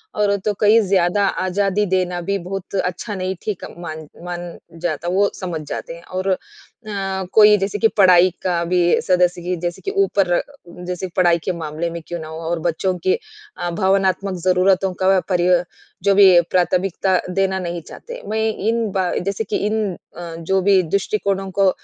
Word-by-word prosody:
और 205 -1 +2
तो 210 - +1
कई 215 +2 +6
ज़्यादा 190 +1 +2 0.2
आज़ादी 200 +2 +1
देना 180 -1 0
भी 200 +3 -1
बहुत 195 +2 -6
अच्छा 190 +3 -2
नहीं 185 0 -3
ठीक 210 -4 -4
मान 160 -2 -7 0.2
मान 175 -1 -6 0.2
जाता, 170 -1 -2
वो 200 +3 +2
समझ 175 -4 -4
जाते 165 - -5
हैं 170 - -14
और 185 +1 -4
अ, 185 - +2 1.0
कोई 210 -1 +7
जैसे 200 +1 -2
कि 225 - +5
पढ़ाई 185 -2 +6
का 175 -2 0
भी 175 0 +2
सदस्य 180 -1 +2
की 180 +1 -2
जैसे 175 -1 -3
कि 390 - -1
ऊपर 185 - +1 0.5
जैसे 180 +1 -3
पढ़ाई 175 -2 +4
के 185 - +1
मामले 160 +1 -3
में 170 0 -6
क्यों 175 0 -4
ना 155 - -7
हो 160 0 -7
और 170 -1 -1
बच्चों 175 +3 -1
की 185 - +5 0.4
अ, 175 - -2
भावनात्मक 190 +1 +1
ज़रूरतों 185 +1 +3
का 190 0 +4
परिव 180 -1 +3 0.4
जो 200 -1 +4
भी 195 -2 +8 0.2
प्राथमिकता 185 +1 +1
देना 190 0 +1
नहीं 170 -1 -4
चाहते। - - -9
मैं 220 +1 -1 0.3
इन 225 -2 0
बा 185 -2 0
जैसे 200 +2 -1
कि 210 - -2
इन 210 -4 -1 0.2
अ, 170 -1 -7
जो 190 +3 0
भी 190 0 +4
दृष्टिकोणों 195 +2 -1
को 195 0 +3
185 Hz, 175 wpm, -20 LUFS, 175-195 Hz, 1.0 s, भी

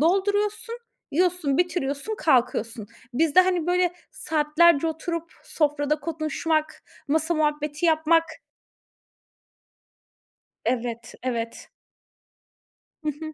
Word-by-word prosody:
dolduruyorsun, 410 +7 +1 0.3
yiyorsun, 345 -3 +1
bitiriyorsun, 350 +2 -1
kalkıyorsun. 240 -6 +1 0.3
Bizde, 320 +4 +5
hani, 360 -3 +1
böyle 360 0 +2 0.2
saatlerce 310 +1 +3
oturup 335 +1 -4
sofrada 295 -1 0
konuşmak, 310 0 -2 0.3
masa 320 +3 +1
muhabbeti 300 +1 0
yapmak 325 +1 +4 2.4
Evet, 235 -1 -2
evet. 230 -2 -4 1.3
Hı 305 - 0
hı. 310 -1 -6
310 Hz, 80 wpm, -25 LUFS, 285-340 Hz, 2.4 s, Bizde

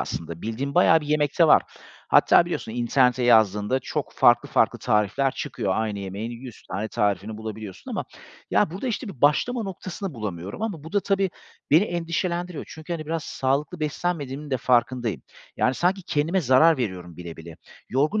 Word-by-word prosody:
aslında. 80 +6 -5
Bildiğim 130 +6 -3
bayağı 160 -2 +5
bir 150 - -8
yemek 150 0 0
de 165 - +7
var. - - +6 0.5
Hatta - - +6
biliyorsun 110 - -4
internete 125 +1 +2
yazdığında 110 0 +4
çok - - -4
farklı, - - +4
farklı - - +2
tarifler 105 +6 +1
çıkıyor. 95 - -3
Aynı 110 -2 -1
yemeğin 100 +4 -5
100 120 0 -10
tane 100 +4 -2
tarifini 105 +1 -1
bulabiliyorsun. 110 -3 -8
Ama - - -3 0.5
ya, 105 +10 +3
burada 190 +9 -5
işte 235 0 -3
bir 150 -11 -10
başlama 225 - +2
noktasını 190 -2 -6
bulamıyorum. 100 - -6
Ama 175 -9 -4
bu 160 - -10
da 205 - +3
tabii, 195 -1 0 0.4
beni 165 +7 +6
endişelendiriyor. 175 -1 -3
Çünkü 160 +2 -8
hani, 155 -2 -4
biraz 165 -1 -3
sağlıklı 140 +3 -1
beslenmediğimin 150 -2 -3
de 130 - +1
farkındayım. 120 -2 +1 0.3
Yani, 130 - +2
sanki 185 +6 0
kendime 165 +4 0
zarar 155 +4 +5
veriyorum 90 -8 -4
bile 85 -2 -8
bile. 80 0 -11 0.3
Yorgun 150 - +1
135 Hz, 170 wpm, -24 LUFS, 110-165 Hz, 0.5 s, de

